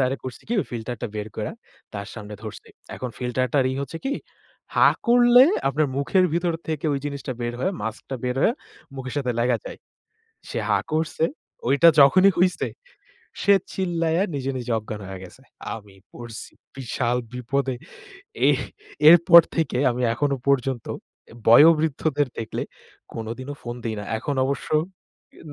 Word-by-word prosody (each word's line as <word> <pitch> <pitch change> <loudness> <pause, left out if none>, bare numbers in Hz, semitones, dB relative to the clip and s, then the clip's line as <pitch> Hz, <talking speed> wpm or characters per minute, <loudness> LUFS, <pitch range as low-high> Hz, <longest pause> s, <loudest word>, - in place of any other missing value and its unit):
তারে 130 +1 +1
করছি 125 -3 -7
কি? - - -2
ওই - - -5
ফিল্টারটা 120 0 -4
বের 105 +1 -4
কইরা - - -4 0.4
তার 100 0 -5
সামনে 105 -2 -8
ধরছি। 110 - -9 0.3
এখন 125 -2 -5
ফিল্টার 125 0 -1
টার 135 -2 +4
ই - - -3
হচ্ছে 165 +4 -6
কি? 280 - 0 0.6
হাঁ - - +5
করলে 245 +1 +7 0.2
আপনার 150 +3 +1
মুখের 185 +7 +2
ভিতর 170 0 +1 0.2
থেকে 155 0 -2
ওই 140 - 0
জিনিসটা 140 -2 -5
বের 120 0 -3
হয়ে 190 - 0
মাস্কটা 115 +4 -5
বের 125 0 -1
হয়ে 235 - +3 0.4
মুখের 130 -1 -6
সাথে 125 -3 -1
লাইগা 120 0 +2
যায়। - - -8 0.7
সে - - -3
হা - - +3
করছে, 160 0 0 0.4
ঐটা 140 +5 +6
যখনই 185 +8 +6
হইছে 180 0 +2 0.7
সে 200 - +6 0.2
চিল্লাইয়া 170 -2 0
নিজে, 135 0 -2
নিজে 120 -1 -6
অজ্ঞান 105 -1 -7
হয়া 95 -1 -7
গেছে। 130 +9 -15 0.3
আমি 105 -3 -12 0.2
পড়ছি 120 -2 -9 0.2
বিশাল 125 -1 -1 0.2
বিপদে। 130 +2 -1 0.8
এহ - - +3 0.5
এরপর 170 0 +9
থেকে 160 -6 0
আমি 125 +1 -4
এখনো 140 +2 0
পর্যন্ত 135 -3 +1 0.5
এ - - -13
বয়ঃবৃদ্ধদের 150 +1 +5
দেখলে 115 -1 -4 0.5
কোনোদিনও 120 +5 -6
ফোন 120 0 -6
দিই 110 -2 -2
না। - - -6 0.2
এখন 140 +3 -3
অবশ্য 140 +1 -3 0.7
ই - - -15
135 Hz, 155 wpm, -23 LUFS, 120-160 Hz, 0.8 s, এরপর